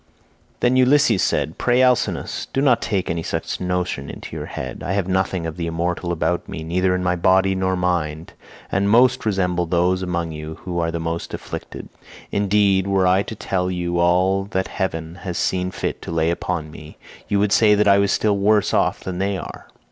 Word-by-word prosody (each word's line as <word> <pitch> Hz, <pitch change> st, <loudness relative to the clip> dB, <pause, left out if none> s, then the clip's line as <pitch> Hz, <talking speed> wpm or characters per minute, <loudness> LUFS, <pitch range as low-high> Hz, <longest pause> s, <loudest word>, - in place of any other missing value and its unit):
62 -, -, -38 dB
Then 125 Hz, +1 st, +3 dB
Ulysses 130 Hz, -, +4 dB
said: 80 Hz, -, -1 dB
"Pray, 125 Hz, +1 st, +3 dB
Alcinous, 125 Hz, -2 st, 0 dB
do -, -, 0 dB
not 135 Hz, -4 st, +3 dB
take 95 Hz, -3 st, -1 dB
any 85 Hz, 0 st, -2 dB
such -, -, -4 dB
notion 90 Hz, -6 st, -2 dB
into -, -, -8 dB
your -, -, -5 dB
head. 65 Hz, -2 st, -6 dB
I 95 Hz, -, -2 dB
have 100 Hz, -2 st, 0 dB
nothing 95 Hz, -2 st, 0 dB
of 80 Hz, +1 st, -5 dB
the 85 Hz, -1 st, -3 dB
immortal 85 Hz, +1 st, -2 dB
about 85 Hz, +1 st, -1 dB
me, 80 Hz, -, -6 dB
neither 90 Hz, +3 st, +1 dB
in 90 Hz, -, -2 dB, 0.2 s
body 95 Hz, +2 st, +3 dB
nor 95 Hz, 0 st, 0 dB
mind, 85 Hz, -3 st, -2 dB, 0.4 s
and 100 Hz, +1 st, +1 dB
most 120 Hz, +1 st, +4 dB
resemble 90 Hz, -4 st, 0 dB
those 90 Hz, +2 st, +1 dB
among 85 Hz, -2 st, -2 dB
you 75 Hz, 0 st, -7 dB
who 90 Hz, -2 st, -3 dB
are 85 Hz, -1 st, 0 dB
the 85 Hz, 0 st, -3 dB
most 85 Hz, +1 st, -4 dB
afflicted. -, -, -8 dB, 0.4 s
Indeed, 100 Hz, -1 st, +2 dB
were 95 Hz, -1 st, +2 dB
I 90 Hz, +2 st, +4 dB
to 110 Hz, -, -6 dB
tell 90 Hz, -3 st, -2 dB
you 85 Hz, -1 st, -2 dB
all 90 Hz, +3 st, +2 dB
that 95 Hz, -2 st, -2 dB
heaven 85 Hz, -2 st, -4 dB
has 90 Hz, -3 st, -4 dB
seen 90 Hz, 0 st, 0 dB
fit -, -, -4 dB
to -, -, -8 dB
lay 80 Hz, 0 st, +1 dB
upon 85 Hz, -3 st, -3 dB
me, 75 Hz, 0 st, -12 dB, 0.3 s
you 100 Hz, -, +1 dB
would 100 Hz, 0 st, +1 dB
say 105 Hz, -1 st, +5 dB
that 105 Hz, 0 st, +2 dB
I 100 Hz, 0 st, +6 dB
was 100 Hz, 0 st, +2 dB
still 105 Hz, -2 st, +1 dB
worse 105 Hz, 0 st, +2 dB
off -, -, +1 dB
than 90 Hz, -1 st, -5 dB
they 100 Hz, 0 st, 0 dB
are. -, -, -9 dB
90 Hz, 200 wpm, -21 LUFS, 85-100 Hz, 0.4 s, I